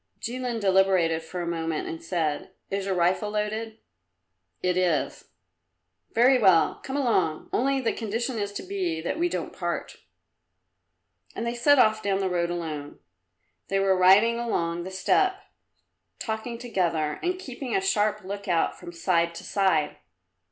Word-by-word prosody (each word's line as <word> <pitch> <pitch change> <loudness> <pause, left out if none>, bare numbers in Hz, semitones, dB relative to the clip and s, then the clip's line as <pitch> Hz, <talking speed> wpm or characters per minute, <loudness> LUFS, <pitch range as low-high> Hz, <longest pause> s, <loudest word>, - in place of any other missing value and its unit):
Jilin 245 0 -3
deliberated 190 -4 +3
for 175 +2 -5
a - - -4
moment 165 -2 -2
and 165 0 -6
said, 165 +1 -2 0.2
"Is 195 0 -2
your 190 - 0
rifle 180 +4 +1
loaded?" 215 +1 -3 0.9
"It 180 -1 +2
is." 180 -4 0 0.9
"Very 250 +3 +5
well; 190 -7 +4
come 270 +1 -3
along. 190 - 0
Only 270 +2 +2
the 235 - 0
condition 230 +2 -3
is 205 -1 -2
to - - -5
be 185 -4 -2
that 225 - -3
we 350 +1 +2
don't - - -4
part." - - -4 1.4
And 230 - -3
they 235 - -1
set 285 +4 +4
off 215 -3 +4
down 200 -2 0
the 195 -1 0
road 170 -1 0
alone. 155 -4 -5 0.7
They 195 - 0
were 195 -1 +3
riding 200 +6 +5
along 170 -7 -1
the - - -5
steppe 375 - +2 0.8
talking 220 +1 -4
together 170 -10 -1
and 360 +1 -1
keeping 265 -7 -5
a - - +4
sharp 215 - +1
look 200 +2 -6
out 170 -3 +1
from 175 -1 -9
side 170 -1 +1
to - - -8
side. 185 -7 +1
195 Hz, 155 wpm, -26 LUFS, 170-230 Hz, 1.4 s, Very